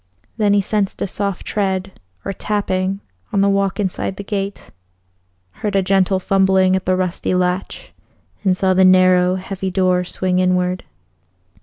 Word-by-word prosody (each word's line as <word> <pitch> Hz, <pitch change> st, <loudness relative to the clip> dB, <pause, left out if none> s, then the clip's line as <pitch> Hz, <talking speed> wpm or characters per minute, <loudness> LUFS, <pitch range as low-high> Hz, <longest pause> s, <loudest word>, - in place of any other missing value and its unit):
Then 205 Hz, -2 st, +3 dB
he 200 Hz, -, +3 dB
sensed 200 Hz, 0 st, -1 dB
a -, -, 0 dB
soft 200 Hz, 0 st, -3 dB
tread 190 Hz, -2 st, -2 dB, 0.3 s
or 195 Hz, -, -3 dB
tapping 195 Hz, -1 st, -2 dB, 0.3 s
on 200 Hz, -, +1 dB
the 200 Hz, -, +3 dB
walk 195 Hz, 0 st, 0 dB
inside 190 Hz, -1 st, -2 dB
the 200 Hz, -, -7 dB
gate, 200 Hz, -1 st, -5 dB, 0.8 s
heard 205 Hz, -, -4 dB
a 195 Hz, -, +3 dB
gentle 190 Hz, 0 st, +2 dB
fumbling 190 Hz, 0 st, +3 dB
at 190 Hz, -, -3 dB
the 185 Hz, -, +3 dB
rusty 185 Hz, 0 st, -1 dB
latch, 180 Hz, +1 st, -2 dB, 0.5 s
and 185 Hz, -2 st, +2 dB
saw 190 Hz, -1 st, +2 dB
the 190 Hz, 0 st, +4 dB
narrow, 185 Hz, -1 st, +5 dB
heavy 190 Hz, 0 st, -4 dB
door 185 Hz, -1 st, +1 dB
swing 185 Hz, 0 st, -1 dB
inward. 180 Hz, 0 st, 0 dB
190 Hz, 155 wpm, -19 LUFS, 185-195 Hz, 0.8 s, narrow